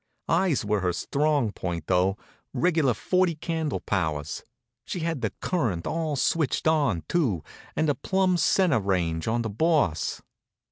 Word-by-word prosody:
Eyes 175 Hz, -, +2 dB
were 105 Hz, 0 st, +1 dB
her 90 Hz, -1 st, 0 dB
strong 145 Hz, -, +1 dB
point, 85 Hz, -4 st, -4 dB
though 95 Hz, +2 st, +2 dB, 0.4 s
regular 150 Hz, -3 st, +2 dB
forty 180 Hz, -, +1 dB
candle 160 Hz, -1 st, -2 dB
powers. 80 Hz, -6 st, -2 dB, 0.4 s
She 180 Hz, -, -5 dB
had 165 Hz, -4 st, -2 dB
the -, -, 0 dB
current 115 Hz, -, -1 dB
all 160 Hz, -2 st, -1 dB
switched 155 Hz, +3 st, +1 dB
on, 145 Hz, -, +2 dB
too, 120 Hz, -, 0 dB, 0.3 s
and 155 Hz, -, +1 dB
a 145 Hz, -, +3 dB
plumb 190 Hz, +3 st, +1 dB
centre 180 Hz, -, +3 dB
range 85 Hz, -5 st, -1 dB
on 115 Hz, +1 st, +1 dB
the 110 Hz, -, -2 dB
Boss. 125 Hz, -, +1 dB
135 Hz, 145 wpm, -26 LUFS, -, 0.4 s, a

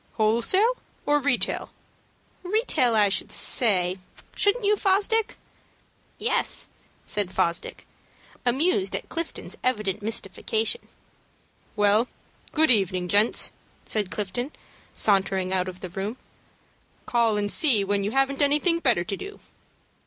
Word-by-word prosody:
"Wholesale 235 Hz, -, +2 dB, 0.3 s
or 295 Hz, 0 st, +3 dB
retail?" 280 Hz, -3 st, 0 dB, 0.7 s
"Retail 360 Hz, -, +1 dB
I 210 Hz, -2 st, +5 dB
should 195 Hz, -, -1 dB
say, 185 Hz, -6 st, +2 dB, 0.4 s
shouldn't 410 Hz, +2 st, +1 dB
you, 415 Hz, +1 st, +4 dB
Fosdick?" 415 Hz, +3 st, +1 dB, 0.8 s
"Yes," -, -, 0 dB, 0.4 s
said 205 Hz, -3 st, 0 dB
Fosdick, 170 Hz, -3 st, -2 dB, 0.6 s
amused 245 Hz, -, +1 dB
at -, -, -6 dB
Clifton's 335 Hz, 0 st, -6 dB
evident 215 Hz, -5 st, -1 dB
mystification. 220 Hz, -, -2 dB, 0.9 s
"Well, 210 Hz, +3 st, +3 dB, 0.4 s
good 315 Hz, -2 st, +3 dB
evening, 185 Hz, -5 st, +1 dB
gents," 210 Hz, +4 st, +3 dB, 0.3 s
said 210 Hz, -4 st, -1 dB
Clifton, 215 Hz, +8 st, -4 dB, 0.4 s
sauntering 190 Hz, -2 st, +1 dB
out 185 Hz, 0 st, 0 dB
of 185 Hz, 0 st, -11 dB
the 185 Hz, -, -6 dB
room. 195 Hz, +7 st, -5 dB, 0.9 s
"Call 230 Hz, -3 st, +1 dB
and 205 Hz, 0 st, -1 dB
see 285 Hz, -8 st, +5 dB
me 200 Hz, -, +1 dB
when 200 Hz, 0 st, 0 dB
you 200 Hz, -, -1 dB
haven't 270 Hz, +3 st, 0 dB
anything 300 Hz, +4 st, +3 dB
better 240 Hz, -, +2 dB
to 195 Hz, -, -4 dB
do." 405 Hz, -, -9 dB
220 Hz, 120 wpm, -25 LUFS, 195-295 Hz, 0.9 s, I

